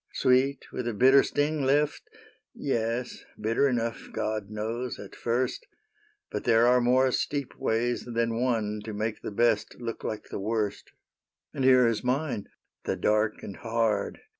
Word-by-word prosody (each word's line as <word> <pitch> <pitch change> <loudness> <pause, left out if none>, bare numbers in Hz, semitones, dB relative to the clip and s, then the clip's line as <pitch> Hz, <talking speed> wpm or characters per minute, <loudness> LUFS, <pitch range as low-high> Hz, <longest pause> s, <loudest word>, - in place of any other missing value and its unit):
'' - - -39
Sweet 130 +1 +2
with 125 - -4
a 120 - -2
bitter 130 +5 +7
sting 150 +1 0
left? 145 +2 +2 0.4
— - - -55
Yes, 120 -2 -2 0.2
Bitter 115 +6 +2
enough, 115 -4 -2
God 110 -2 -3
knows, 115 +4 -3
at - - -10
first; 125 - -1 0.6
But - - -3
there 115 +1 +4
are 125 +1 +5
more 130 +2 +3
steep 140 +1 -2
ways 120 +2 0
than 115 -1 -1
one 110 -4 0
To 110 - -5
make 110 +1 -3
the - - -4
best 110 +1 +1
look 115 -2 -5
like 110 -1 -5
the - - -4
worst; 105 0 -2 0.3
" - - -60
And 135 - -2
here 130 -1 +6
is 115 -2 0
mine 130 -3 -1 0.2
— - - -55
the - - 0
dark 105 0 +1
and 100 - -7
hard. 115 -3 -1
115 Hz, 170 wpm, -28 LUFS, 110-130 Hz, 0.6 s, bitter